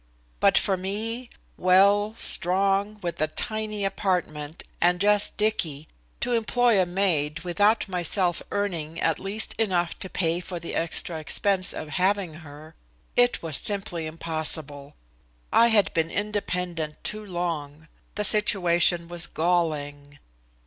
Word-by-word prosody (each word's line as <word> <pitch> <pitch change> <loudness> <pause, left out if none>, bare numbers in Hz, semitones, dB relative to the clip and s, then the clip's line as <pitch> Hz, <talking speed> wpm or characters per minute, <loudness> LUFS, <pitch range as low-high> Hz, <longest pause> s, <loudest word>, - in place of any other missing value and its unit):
But - - +4
for 190 - +1
me, 225 +6 -3 0.3
well, 200 +4 +3
strong, 195 +2 +3
with 170 -2 -4
a 155 - +2
tiny 215 +3 -2
apartment, 170 -6 -2 0.2
and 175 +1 +3
just 205 +1 +2
Dicky, 165 -9 -1 0.3
to 245 - 0
employ 235 -2 +2
a 180 - 0
maid 165 -5 0
without 205 +6 +1
myself 180 -1 0
earning 165 -5 -3
at 165 - 0
least 200 +3 +1
enough 180 -6 0
to 190 - -7
pay 170 -2 0
for 180 -1 -7
the 170 - -6
extra 165 0 -2
expense 185 +4 +2
of 155 - -7
having 190 -3 +1
her 155 +1 -13 0.4
it 245 -5 +2
was 160 -4 +1
simply 195 -6 -2
impossible. 155 -3 -4 0.6
I 235 - +6
had 220 -3 +2
been 165 0 0
independent 180 -6 -3
too 215 0 -3
long. 165 -5 -5 0.3
The 210 - -1
situation 175 -4 +3
was 175 0 -1
galling. 145 -4 -2
180 Hz, 130 wpm, -25 LUFS, 160-205 Hz, 0.6 s, I